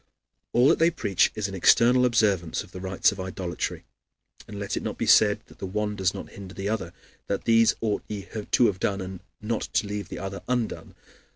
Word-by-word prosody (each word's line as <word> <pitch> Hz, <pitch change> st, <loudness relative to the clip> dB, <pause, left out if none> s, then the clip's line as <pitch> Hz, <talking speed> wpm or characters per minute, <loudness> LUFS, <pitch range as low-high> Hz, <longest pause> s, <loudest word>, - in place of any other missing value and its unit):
All 125 Hz, +2 st, +4 dB
that -, -, +3 dB
they 165 Hz, +1 st, +5 dB
preach 100 Hz, -, +1 dB
is 105 Hz, -2 st, -2 dB
an 100 Hz, -, -8 dB
external 125 Hz, +6 st, +5 dB
observance 100 Hz, -8 st, +1 dB
of -, -, -17 dB
the 90 Hz, -, -8 dB
rites 95 Hz, 0 st, +2 dB
of 100 Hz, -, -9 dB
idolatry. 95 Hz, -1 st, -4 dB, 0.6 s
And 105 Hz, -, -8 dB
let 100 Hz, 0 st, -3 dB
it -, -, -2 dB
not -, -, -4 dB
be -, -, -1 dB
said -, -, +5 dB
that -, -, -19 dB
the 95 Hz, -, -4 dB
one 105 Hz, +2 st, -2 dB
does 95 Hz, -2 st, +1 dB
not -, -, -8 dB
hinder 100 Hz, -1 st, -10 dB
the 100 Hz, +1 st, -3 dB
other, 105 Hz, -6 st, -2 dB, 0.4 s
that 100 Hz, -, -2 dB
"These 115 Hz, 0 st, +4 dB
ought 110 Hz, -2 st, 0 dB
ye 105 Hz, -2 st, -6 dB
to 110 Hz, +3 st, +1 dB
have 95 Hz, -5 st, +1 dB
done, 100 Hz, 0 st, 0 dB
and 95 Hz, -1 st, -6 dB, 0.2 s
not 110 Hz, +1 st, -1 dB
to -, -, +2 dB
leave 100 Hz, -2 st, -5 dB
the -, -, -6 dB
other 95 Hz, +1 st, -5 dB
undone." 125 Hz, -3 st, -2 dB
100 Hz, 215 wpm, -26 LUFS, 95-110 Hz, 0.6 s, they